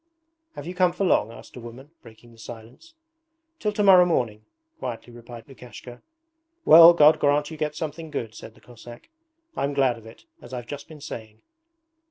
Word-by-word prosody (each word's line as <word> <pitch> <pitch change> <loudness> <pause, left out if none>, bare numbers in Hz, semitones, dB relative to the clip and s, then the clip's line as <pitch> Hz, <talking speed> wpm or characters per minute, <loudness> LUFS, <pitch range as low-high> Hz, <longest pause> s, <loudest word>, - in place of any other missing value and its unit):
'Have - - -8
you 175 - -6
come 180 -1 +2
for 195 +2 -2
long?' 115 - +1
asked - - -14
a - - -9
woman, 120 +5 -12
breaking 115 +1 -17
the 115 - -20
silence. 120 - -13 0.6
'Till 210 - -1
to 210 0 -1
morrow 190 -2 +7
morning,' 115 -11 -2 0.3
quietly 120 0 -7
replied 120 0 -12
Lukashka. 125 -2 -13 0.6
'Well, 165 +1 +9
God 155 -1 +5
grant 145 +1 +1
you 160 - -8
get 150 0 -3
something 160 +1 -6
good,' 115 -7 -5
said 110 0 -12
the - - -22
Cossack; 120 - -14 0.5
'I'm 140 0 -2
glad 130 -4 +1
of 110 - -16
it, 115 - -16 0.2
as - - -13
I've 120 -1 -7
just 145 +3 -9
been 155 -2 -13
saying.' 110 -6 -10
130 Hz, 185 wpm, -24 LUFS, 115-160 Hz, 0.6 s, Well